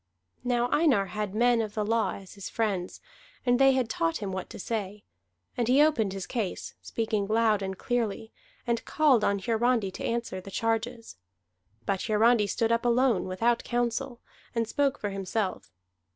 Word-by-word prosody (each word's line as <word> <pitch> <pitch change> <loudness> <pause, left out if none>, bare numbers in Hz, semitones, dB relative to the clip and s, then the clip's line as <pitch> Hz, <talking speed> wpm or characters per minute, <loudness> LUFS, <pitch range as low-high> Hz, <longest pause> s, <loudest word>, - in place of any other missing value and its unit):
Now 245 -1 +1
Einar 260 - +3
had 210 -2 -3
men 240 +1 +4
of 215 -2 -5
the 210 -1 0
law 225 +1 +1
as 195 -2 -11
his 200 -2 -7
friends, 195 -5 -2 0.4
and 245 0 +3
they 270 0 +6
had 260 -3 +1
taught 165 -7 0
him 200 -2 -4
what 185 -1 -5
to - - -9
say. 205 -1 -4 0.5
And 240 -2 0
he 255 +3 +4
opened 230 -11 +2
the 195 -1 -5
case, 220 -7 -3
speaking 215 -3 -2
loud 220 -1 +2
and 190 -1 -4
clearly, 225 -2 -2 0.3
and 235 -1 0
called 280 -8 +3
on 200 - +2
Hiarandi 225 0 +1
to - - -7
answer 230 -5 -2
the 195 - -10
charges. 225 - -2 0.7
But 195 -2 -1
Hiarandi 220 0 +4
stood 230 +2 0
up 230 +1 +2
alone, 240 -3 +3
without 230 +6 +1
counsel, 240 +1 -2 0.4
and 230 -1 0
spoke 285 +3 +1
for 205 - -3
himself. 195 - -3
225 Hz, 170 wpm, -28 LUFS, 200-240 Hz, 0.7 s, they